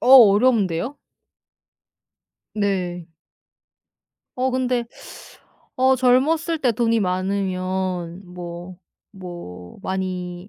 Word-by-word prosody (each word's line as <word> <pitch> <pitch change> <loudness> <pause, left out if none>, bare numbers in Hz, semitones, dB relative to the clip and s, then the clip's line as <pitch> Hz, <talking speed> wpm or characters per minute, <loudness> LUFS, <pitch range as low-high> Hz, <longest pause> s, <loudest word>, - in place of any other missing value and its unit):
어 - - 0 0.2
어려운데요? 220 - +1 1.6
네. 180 -5 -2 1.3
어 260 +1 +1
근데 250 -2 0 0.9
어 260 +1 +4
젊었을 305 +7 +2
때 245 -3 +2
돈이 230 0 +1
많으면 185 -1 -2
뭐 175 0 -8 0.4
뭐 175 - -9
많이 185 -1 -4
190 Hz, 135 characters per minute, -22 LUFS, 180-245 Hz, 1.6 s, 어